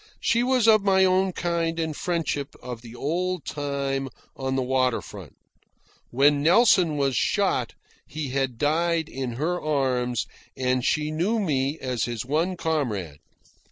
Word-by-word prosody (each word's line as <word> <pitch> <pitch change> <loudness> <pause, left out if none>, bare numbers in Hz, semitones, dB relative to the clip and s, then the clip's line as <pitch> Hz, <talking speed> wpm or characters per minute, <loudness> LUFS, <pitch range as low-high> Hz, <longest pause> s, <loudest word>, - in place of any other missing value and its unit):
She 235 -2 +2
was 250 -2 +2
of 215 -1 +6
my 190 -1 +4
own 185 +1 +2
kind 170 -2 -1
and 160 -2 -2
friendship 155 -5 -2
of 125 -2 -7
the 120 0 -11
old 175 +5 -2
time 140 -2 -2 0.3
on 130 0 -2
the 130 - 0
water 130 -1 +1
front. 95 -9 -11 0.7
When 140 +3 +3
Nelson 175 -2 +4
was 135 -2 +1
shot, - - 0 0.3
he 150 -2 -5
had 130 -2 -1
died 165 +3 +1
in 130 -5 -4
her 165 +8 -2
arms, 130 -5 0 0.3
and 130 -1 0
she 150 +3 0
knew 180 +9 0
me 145 -6 0
as 125 -6 -2
his 120 -1 -4
one 165 +7 0
comrade. 110 - -2
145 Hz, 150 wpm, -25 LUFS, 130-170 Hz, 0.7 s, of